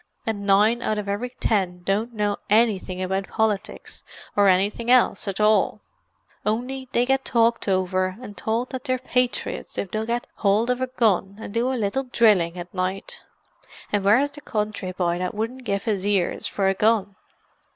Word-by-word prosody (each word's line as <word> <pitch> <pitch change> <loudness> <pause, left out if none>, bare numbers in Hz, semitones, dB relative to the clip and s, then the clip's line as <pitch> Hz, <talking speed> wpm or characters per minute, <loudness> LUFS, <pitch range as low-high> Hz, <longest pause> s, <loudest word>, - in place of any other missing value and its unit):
"And 205 -2 -3
nine 210 +4 +4
out 215 -2 -1
of 210 -1 -4
every 205 +5 -2
ten 190 -7 -1
don't 210 +6 0
know 210 -2 -1
annything 205 -4 +2
about 190 +1 -2
politics 215 -3 -2 0.3
or 205 -1 +5
annything 200 +5 +2
else 250 -3 +4
at 195 0 -3
all, 215 0 +3 0.6
only 250 +4 -2
they 240 - +2
get 270 +1 +1
talked 230 -2 +2
over, 185 0 0
and 205 -5 -9
towld 225 +6 -2
that 260 -1 -6
they're 255 0 +1
patriots 250 -1 -2
if 195 - -3
they'll 220 +1 -2
get 240 +1 -1 0.2
howld 215 +4 +3
of 250 +1 -2
a 260 - 0
gun 205 -6 +1
and 200 - -8
do 240 +3 +1
a - - -1
little 230 +5 -1
drilling 205 -8 +3
at 175 0 -8
night—an' 190 +2 -5
where's 235 +9 +3
the 295 +1 -11
country 210 -5 -3
boy 175 -1 -1
that 180 +1 -3
wouldn't 240 +4 -4
give 200 -2 -1
his 205 -5 -1
ears 200 -3 0
for 195 -1 0
a 195 - +3
gun! 205 -1 +1
210 Hz, 175 wpm, -24 LUFS, 195-235 Hz, 0.6 s, or